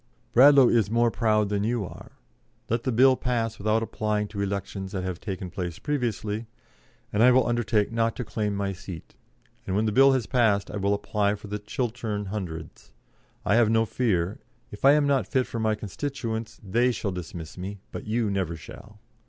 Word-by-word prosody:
Bradlaugh 135 Hz, +1 st, +8 dB
is 115 Hz, -4 st, +2 dB
more 115 Hz, +1 st, +3 dB
proud 110 Hz, -3 st, +1 dB
than 100 Hz, -1 st, 0 dB
you 115 Hz, -1 st, 0 dB
are. -, -, -11 dB, 0.6 s
Let 115 Hz, +1 st, -1 dB
the 130 Hz, -, +1 dB
Bill 130 Hz, +3 st, +5 dB
pass 115 Hz, -3 st, -2 dB
without 110 Hz, +2 st, +1 dB
applying 105 Hz, -1 st, -1 dB
to 100 Hz, -1 st, -5 dB
elections 100 Hz, -1 st, -4 dB
that 95 Hz, -2 st, -2 dB
have 90 Hz, -2 st, -4 dB
taken 95 Hz, -3 st, -5 dB
place 85 Hz, -2 st, -4 dB
previously, 115 Hz, -6 st, -2 dB, 0.7 s
and 105 Hz, -, +2 dB
I 125 Hz, -, +8 dB
will 130 Hz, 0 st, +5 dB
undertake 115 Hz, -3 st, +1 dB
not 115 Hz, 0 st, 0 dB
to 125 Hz, -, -3 dB
claim 105 Hz, -1 st, -2 dB
my 100 Hz, 0 st, -2 dB
seat, 90 Hz, -3 st, -9 dB, 0.5 s
and 95 Hz, -, -1 dB
when 105 Hz, +2 st, +2 dB
the 110 Hz, -, +1 dB
Bill 135 Hz, +4 st, +6 dB
has 130 Hz, -4 st, 0 dB
passed 110 Hz, -6 st, +2 dB
I 105 Hz, -, -4 dB
will 100 Hz, +1 st, +1 dB
apply 100 Hz, 0 st, 0 dB
for 105 Hz, 0 st, -11 dB
the 105 Hz, +1 st, -3 dB
Chiltern 110 Hz, -1 st, -3 dB
Hundreds. 85 Hz, -6 st, -7 dB, 0.5 s
I 100 Hz, -, +2 dB
have 120 Hz, -3 st, +4 dB
no 115 Hz, 0 st, +3 dB
fear. 100 Hz, -6 st, 0 dB, 0.3 s
If 105 Hz, -, -4 dB
I 140 Hz, -, +8 dB
am 150 Hz, -1 st, +3 dB
not 140 Hz, -2 st, +1 dB
fit 130 Hz, -3 st, +1 dB
for 115 Hz, -, -5 dB
my 110 Hz, -1 st, +1 dB
constituents, 110 Hz, 0 st, -5 dB
they 120 Hz, +6 st, +3 dB
shall 105 Hz, -4 st, -3 dB
dismiss 85 Hz, -3 st, -7 dB
me, 95 Hz, +3 st, -6 dB
but -, -, -7 dB
you 110 Hz, -1 st, 0 dB
never 95 Hz, -4 st, -1 dB
shall. 80 Hz, -, -12 dB
110 Hz, 195 wpm, -26 LUFS, 100-120 Hz, 0.7 s, Bradlaugh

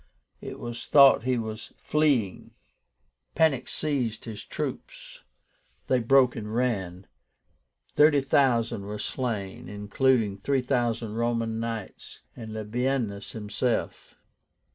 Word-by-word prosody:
It -, -, -7 dB
was 120 Hz, 0 st, -6 dB
thought 140 Hz, -4 st, +6 dB
he 130 Hz, -1 st, +1 dB
was 110 Hz, -1 st, -6 dB
fleeing. 140 Hz, -11 st, 0 dB, 0.8 s
Panic 155 Hz, -6 st, +2 dB
seized 130 Hz, -8 st, -2 dB
his 110 Hz, -3 st, -7 dB
troops, -, -, -6 dB, 0.6 s
they 130 Hz, -, +2 dB
broke 125 Hz, +1 st, +4 dB
and 105 Hz, 0 st, -5 dB
ran. 95 Hz, -7 st, -1 dB, 0.9 s
Thirty 150 Hz, -1 st, +5 dB
thousand 120 Hz, -6 st, +1 dB
were 105 Hz, +1 st, -5 dB
slain, 105 Hz, -4 st, -4 dB
including 105 Hz, +1 st, +1 dB
three 135 Hz, +6 st, 0 dB
thousand 120 Hz, -4 st, -1 dB
Roman 115 Hz, -1 st, -1 dB
Knights, 115 Hz, -3 st, -6 dB
and 110 Hz, -2 st, -8 dB
Labiénus 110 Hz, -1 st, -2 dB
himself. 110 Hz, +2 st, -2 dB
115 Hz, 105 wpm, -27 LUFS, 110-130 Hz, 0.9 s, thought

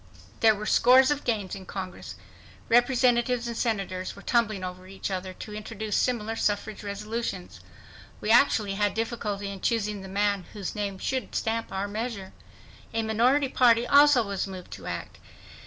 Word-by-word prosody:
There 220 Hz, -1 st, +5 dB
were 210 Hz, +1 st, -6 dB
scores 260 Hz, +5 st, +5 dB
of 290 Hz, -1 st, -1 dB
gains 210 Hz, -5 st, -1 dB
in 190 Hz, -2 st, -8 dB
Congress. 185 Hz, -2 st, -7 dB, 0.5 s
Representatives 245 Hz, 0 st, +3 dB
and 235 Hz, -, -4 dB
Senators 195 Hz, -6 st, -2 dB
were 200 Hz, -, -13 dB
tumbling 215 Hz, -5 st, +1 dB
over 185 Hz, 0 st, -7 dB
each 195 Hz, +1 st, -5 dB
other 185 Hz, 0 st, -3 dB
to 210 Hz, +3 st, -9 dB
introduce 215 Hz, 0 st, -4 dB
similar 225 Hz, -3 st, 0 dB
suffrage 210 Hz, -1 st, -1 dB
resolutions. 200 Hz, -, -5 dB, 0.6 s
We 215 Hz, -, -1 dB
actually 220 Hz, -4 st, +4 dB
had 205 Hz, 0 st, 0 dB
difficulty 210 Hz, -3 st, -3 dB
in 195 Hz, -2 st, -8 dB
choosing 210 Hz, -3 st, -1 dB
the 190 Hz, -, -8 dB
man 200 Hz, -1 st, 0 dB
whose 200 Hz, -4 st, -5 dB
name 200 Hz, -2 st, -3 dB
should 260 Hz, +6 st, -3 dB
stamp 225 Hz, 0 st, -1 dB
our 195 Hz, +1 st, -2 dB
measure. 210 Hz, -2 st, -5 dB, 0.6 s
A 225 Hz, -, +1 dB
minority 245 Hz, +6 st, +2 dB
party 240 Hz, -2 st, +4 dB
also 285 Hz, -2 st, +6 dB
was 200 Hz, -1 st, -2 dB
moved 185 Hz, -2 st, -9 dB
to -, -, -8 dB
act. -, -, -6 dB
215 Hz, 160 wpm, -27 LUFS, 195-235 Hz, 0.6 s, also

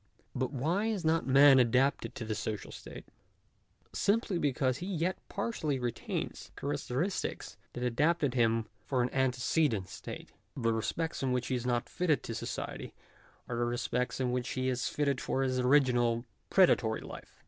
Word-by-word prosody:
But 130 Hz, +1 st, -1 dB
why 165 Hz, -, 0 dB
is 205 Hz, -7 st, -2 dB
not 160 Hz, -1 st, +2 dB
man 135 Hz, 0 st, +7 dB
adapted 125 Hz, +3 st, +2 dB
to 115 Hz, -, -5 dB
the 110 Hz, -, -2 dB
social 105 Hz, 0 st, -4 dB
state? -, -, -10 dB, 0.9 s
Simply 205 Hz, -3 st, +1 dB
because 130 Hz, -2 st, +1 dB
he 180 Hz, -, -5 dB
yet 185 Hz, -1 st, 0 dB
partially 200 Hz, -9 st, -2 dB
retains 120 Hz, -2 st, -3 dB
the -, -, -11 dB
characteristics 145 Hz, +5 st, -2 dB, 0.2 s
that 125 Hz, -, -4 dB
adapted 145 Hz, +3 st, +2 dB
him 115 Hz, -2 st, +2 dB, 0.2 s
for 130 Hz, -3 st, 0 dB
an 125 Hz, -, -1 dB
antecedent 130 Hz, -, +1 dB
state. -, -, -8 dB, 0.3 s
The 115 Hz, -3 st, +1 dB
respects 160 Hz, +9 st, -2 dB
in 130 Hz, -2 st, +1 dB
which 125 Hz, 0 st, -1 dB
he 130 Hz, -, +1 dB
is 125 Hz, 0 st, -3 dB
not 120 Hz, -1 st, 0 dB
fitted 155 Hz, -7 st, 0 dB
to 115 Hz, -, -4 dB
society -, -, -5 dB, 0.5 s
are 120 Hz, -, -3 dB
the 120 Hz, -, +1 dB
respects 120 Hz, +1 st, -1 dB
in 125 Hz, -1 st, 0 dB
which 125 Hz, 0 st, -1 dB
he 130 Hz, 0 st, 0 dB
is 125 Hz, +1 st, -1 dB
fitted 140 Hz, -3 st, 0 dB
for 135 Hz, -, 0 dB
his 130 Hz, -1 st, 0 dB
original 125 Hz, -3 st, +3 dB, 0.2 s
predatory 125 Hz, -, +4 dB
life. -, -, -11 dB
130 Hz, 165 wpm, -31 LUFS, 120-150 Hz, 0.9 s, man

